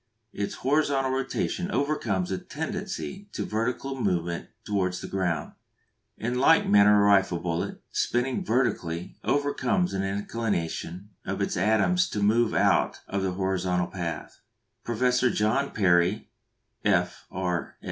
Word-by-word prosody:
Its 100 - -3
horizontal 135 -1 +1
rotation 135 +7 -2
overcomes 120 - 0
a 95 - -1
tendency 195 +3 -5
to - - -3
vertical 125 +4 -2
movement 85 -4 -1 0.2
towards 90 -3 0
the - - -6
ground. 90 -6 -1 0.7
In 120 +3 -2
like 160 +5 +5
manner 105 0 +6
a - - +4
rifle 95 -3 +4
bullet, 85 -1 -3
spinning 125 +9 0
vertically, 105 - -1
overcomes 160 +7 +1
an 95 - -1
inclination 100 -2 -3
of - - -3
its - - -1
atoms 110 - +2
to 105 - -2
move 115 +2 +3
out - - +2
of 100 - -2
their 95 -1 -1
horizontal 90 -1 0
path. 85 -3 -5 0.4
Professor 125 +2 +2
John 110 +7 +1
Perry, 90 +1 +2 0.5
F.R. 90 -2 -1
105 Hz, 125 wpm, -27 LUFS, 90-130 Hz, 0.7 s, manner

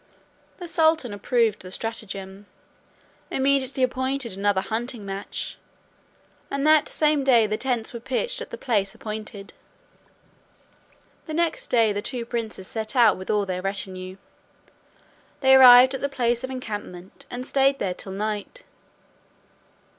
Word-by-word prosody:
The 355 - -8
sultan 320 -8 +2
approving 225 +1 +1
the 185 - -10
stratagem, 195 -2 -6 0.8
immediately 270 -1 +1
appointed 260 -2 -1
another 200 0 +1
hunting 230 0 -4
match. 195 0 -5 0.9
And 275 +1 -2
that 310 -1 +5
same 300 -2 +2
day 240 -4 +5
the 215 0 -1
tents 245 -1 -2
were 235 - -5
pitched 265 - -2
at - - -7
the - - -7
place 200 -6 -1
appointed. 215 -2 -7 1.7
The 310 - -4
next 335 0 0
day 225 -3 +3
the 205 - -3
two 240 +1 -3
princes 225 -5 -5
set 220 +2 -4
out 230 -5 +5
with 185 - -10
all 210 -1 +1
their 185 -1 -3
retinue; 190 -1 -4 1.2
they 265 -1 +5
arrived 255 0 +9
at 265 - -4
the 280 - -1
place 240 -3 0
of 260 - -4
encampment, 205 -8 -8
and 250 +1 -6
stayed 275 0 +2
there 190 -6 -2
till 190 +2 -9
night. 215 - -4
235 Hz, 140 wpm, -24 LUFS, 200-265 Hz, 1.7 s, arrived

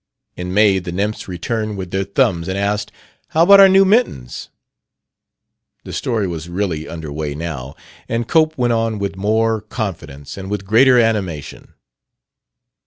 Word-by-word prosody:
"In 90 0 -5
May 100 -1 +4
the 90 -1 -7
nymphs 100 +4 -3
returned 105 +4 -3
with 90 -2 -6
their 95 0 -1
thumbs 85 -3 0
and 95 +1 -2
asked, 105 +1 -1 0.4
'How 160 - +2
about 200 +3 +8
our 195 -1 +9
new 195 +1 +5
mittens?'" 190 - 0 1.3
The - - -9
story 115 -5 -1
was 85 -1 -6
really 85 -4 -3
under 80 -3 -7
way 75 -1 -4
now, 75 -5 -6 0.3
and 115 0 -2
Cope 160 -1 +2
went 120 -2 +1
on 115 -1 0
with 100 -1 -3
more 110 +2 0
confidence 95 - -6
and 95 0 -7
with 100 -1 -4
greater 125 +5 +5
animation. 100 - -2
100 Hz, 155 wpm, -18 LUFS, 85-115 Hz, 1.3 s, our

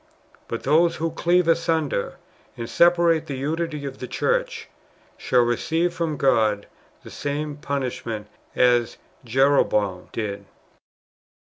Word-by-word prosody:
But 115 - -5
those 165 +4 +3
who 165 0 -2
cleave 175 +2 +2
asunder, 165 -8 0 0.4
and 115 - -5
separate 170 -1 +3
the 140 - -4
unity 155 +1 -3
of 135 -1 -7
the 125 - -6
church, 485 - -1 0.5
[shall] 125 -1 +2
receive 165 +8 0
from 165 -3 -2
God 110 -7 +2 0.4
the - - -11
same 145 +1 -3
punishment 130 -7 -4 0.3
as 120 -1 +3 0.3
Jeroboam 115 -7 +1
did. 105 -3 -4
145 Hz, 115 wpm, -23 LUFS, 120-165 Hz, 0.5 s, those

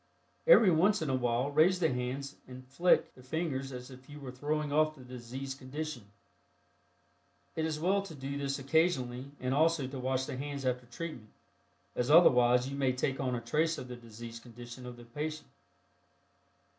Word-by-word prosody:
Every 225 - +8
once 185 +3 +3
in 145 - -1
a - - +2
while 125 +2 0
raise 165 +5 +4
the 160 -6 +2
hands 130 +3 -3
and 130 0 -10
"flick" 170 +7 +3
the 130 - -16
fingers 135 -1 -3
as 125 +1 -8
if 130 +1 -14
you 145 0 -9
were 135 -3 -7
throwing 150 +3 -2
off 155 +1 +3
the 130 - -13
diseased 130 +2 -7
condition. 130 -4 -6 1.5
It 160 - 0
is 155 -1 -2
well 190 +5 +2
to 195 -5 -9
do 140 0 -5
this 140 -1 -2
occasionally 135 -3 +1
and 130 +1 -1
also 160 0 +3
to 130 +1 -6
wash 130 +1 0
the - - -5
hands 140 0 -4
after 125 -1 -1
treatment, 120 -4 -7 0.7
as 125 +2 -1
otherwise 125 -6 +6
you 140 - -5
may 135 -2 +1
take 130 +1 -1
on 130 -2 0
a 120 - -3
trace 155 +7 +1
of 125 - -7
the 125 - -6
diseased 115 0 -10
condition 120 +1 -10
of 120 -1 -8
the 120 - -12
patient. 150 +6 -5
135 Hz, 180 wpm, -32 LUFS, 125-155 Hz, 1.5 s, Every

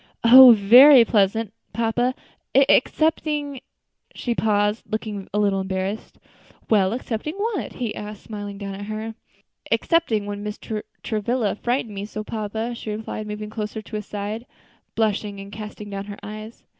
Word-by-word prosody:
"Oh! 250 +1 +10
very 240 +5 +8
pleasant, 210 0 +1 0.2
papa, 240 +2 0 0.4
excepting 290 0 +2 0.3
" - - -36
She 240 - -2
paused, 210 -1 +1
looking 215 -3 -4
a 205 - -2
little 200 -2 +2
embarrassed. 190 +3 -4 0.5
"Well, 195 -3 +4
excepting 250 +5 -4
what?" 420 0 -3
he 235 -5 -3
asked, 210 0 -8
smiling 205 -2 -7
down 200 -1 -6
at 200 +1 -7
her. 215 +1 -5 0.6
"Excepting 285 -12 +1
when 205 0 -5
Mr. 210 +1 -5 0.2
Travilla 220 0 -1
frightened 240 0 -2
me 200 0 -5
so, 215 0 -6
papa," 220 +2 -4
she 230 - -7
replied, 215 0 -5
moving 210 0 -6
closer 215 0 -5
to 215 - -9
his 210 -1 -5
side, 210 +4 -5 0.5
blushing 210 -2 -1
and 195 0 -9
casting 210 0 -8
down 195 0 -5
her 205 0 -8
eyes. 215 +2 -9
215 Hz, 150 wpm, -23 LUFS, 205-235 Hz, 0.6 s, Oh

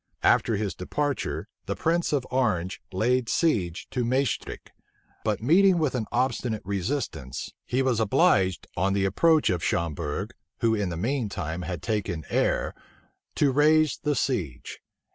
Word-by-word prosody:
After 115 - +4
his 100 -1 -2
departure, 145 +9 -2 0.2
the - - -1
prince 170 +1 0
of 140 -4 0
Orange 105 -8 0
laid 120 +5 +1
siege 95 - 0
to 125 - -1
Maestricht; 130 +1 -1 0.5
but 110 -1 -1
meeting 185 +7 +5
with 155 -5 +1
an 115 -4 -2
obstinate 120 -3 -1
resistance, 95 - -3
he 130 +2 +1
was 125 -4 +1
obliged, 100 - +3
on 95 +2 +1
the 100 -1 +1
approach 155 - +3
of 90 -2 -2
Schomberg, 85 +4 -2 0.3
who 115 -1 +3
in 105 -4 0
the 85 - -4
mean 120 +4 -1
time 90 -5 -4
had 85 -1 -5
taken 100 - -2
Aire, - - +1 0.6
to 145 -2 +3
raise 155 +1 +4
the 150 -1 0
siege. 85 - -2
110 Hz, 145 wpm, -26 LUFS, 95-135 Hz, 0.6 s, meeting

